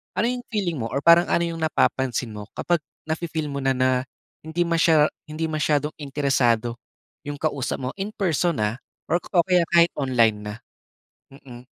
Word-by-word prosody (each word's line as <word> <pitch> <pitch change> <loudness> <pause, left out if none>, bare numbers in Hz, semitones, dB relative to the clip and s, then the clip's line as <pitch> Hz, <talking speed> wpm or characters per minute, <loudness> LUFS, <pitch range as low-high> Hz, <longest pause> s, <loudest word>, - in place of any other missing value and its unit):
Ano 230 - +1
'yong 245 -1 -5
feeling 185 -8 -1
mo 115 - -2
or 140 - -1
parang 170 +1 +6
ano 170 - +3
'yong 165 -1 -4
napapansin 130 -6 0
mo 105 -1 -8
kapag 175 -2 +1 0.3
na-fi-feel 160 -1 -2
mo 140 - -3
na 135 0 +2
na, 130 0 +2 0.5
hindi 160 +2 -1
masya 165 -2 +4 0.2
hindi 155 +1 -3
masyadong 150 -1 +1
interesado 135 -5 +1 0.5
'yong 145 - -3
kausap 145 -4 -1
mo 130 - -2
in-person, 180 - 0
ah, 105 +2 0 0.4
or 175 - +3
o 175 -1 +1
kaya 180 -2 +4
kahit 170 0 +6
online 120 -6 +3
na? 105 0 -5 0.8
Mm. 125 -3 -13
150 Hz, 165 wpm, -24 LUFS, 130-170 Hz, 0.8 s, parang